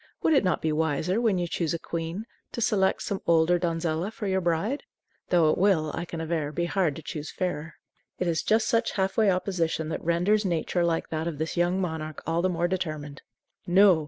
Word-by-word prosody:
Would 320 - +4
it 275 - +4
not 180 - 0
be 160 - +1
wiser, 160 +6 0
when 220 -5 +2
you 175 -1 -1
choose 170 -1 -1
a - - -4
queen, 170 +6 -4 0.3
to - - -4
select 195 -4 +2
some 200 - -3
older 170 +1 +4
donzella 165 +1 -1
for 220 - -6
your 190 -1 +1
bride? 175 - 0 0.5
Though 165 -4 +4
it - - -1
will, 175 -6 +3
I 170 - -3
can 165 -1 -6
aver, 160 -2 -2
be 170 +2 -1
hard 170 -4 +1
to 160 - -9
choose 155 -1 -5
fairer." 165 -3 -3 0.4
It 180 - -1
is 165 -2 +1
just 220 +1 +2
such 230 0 +1
half 190 -1 0
way 215 -3 +4
opposition 175 -4 0
that 160 - -4
renders 180 +6 +2
nature 175 -1 0
like 165 -1 0
that 160 +1 -2
of 165 -3 -3
this 160 +2 -3
young 175 +2 +2
monarch 160 -4 -4
all 165 +1 +1
the 185 - +2
more 175 -1 0
determined. 155 -6 -4 0.5
No! 185 -1 +6
170 Hz, 215 wpm, -27 LUFS, 160-190 Hz, 0.5 s, No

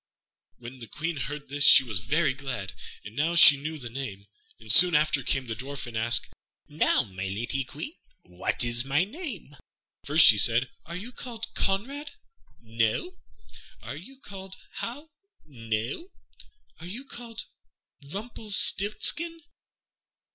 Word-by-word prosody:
'" - - -53
When 125 +2 -11
the 115 - -10
Queen 155 +7 -4
heard 145 +2 -5
this 145 +1 +2
she 135 - +8
was 110 -7 -1
very 150 - +1
glad, 130 -8 -6 0.3
for 105 - -9
now 155 +8 -1
she 160 -3 +9
knew 155 +3 -6
the 125 -5 -8
name; 110 -7 -7 0.3
and 110 -2 0
soon 175 - +8
after 150 -2 +2
came 135 +1 -1
the 115 - -4
Dwarf, 135 +4 -6
and 120 -2 -9
asked, 115 0 +3 0.4
"Now, 150 -4 +2
my 95 -3 -7
lady 115 +7 -3
Queen, 150 - -8 0.3
what - - -2
is 120 0 +1
my 135 +5 +1
name?" 215 - -8 0.5
First 150 +2 +5
she 105 - +7
said, 120 +4 +3 0.2
"Are 170 - -7
you 210 +7 -7
called 230 -2 -8
Conrade?" 270 +10 -2 0.5
"No." 115 - -2 0.7
"Are - - -6
you 270 0 -12
called 190 -5 -9 0.2
Hal?" 290 +7 -6 0.3
"No." 115 - -4 0.7
"Are 165 - -9
you 235 +9 -7
called 235 -4 -9 0.7
Rumpelstiltskin?" 220 - +2
145 Hz, 145 wpm, -27 LUFS, -, 0.7 s, she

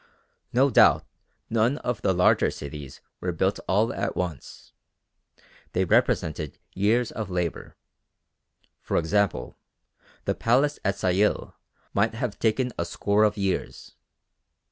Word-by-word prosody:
No 135 +3 +3
doubt - - +5 0.4
none 115 +5 +1
of 125 -7 -3
the - - +2
larger 90 -1 +3
cities 70 -2 -8 0.2
were 90 - -2
built 95 +4 0
all 105 +4 +2
at 100 +1 -2
once. 85 -7 -6 1.0
They 95 - +1
represented 75 -3 +1 0.2
years 110 +5 +1
of 110 -4 -5
labour. 90 -2 -3 1.1
For - - -1
example 100 +5 0 0.7
the - - +1
Palace 135 +6 +2
at 100 0 +1
Sayil 95 +3 +1 0.4
might 110 +3 +1
have 115 -3 -3
taken 125 +3 +1
a - - +2
score 100 +4 +1
of 105 0 +2
years. 100 -2 -3
100 Hz, 120 wpm, -26 LUFS, 90-115 Hz, 1.1 s, doubt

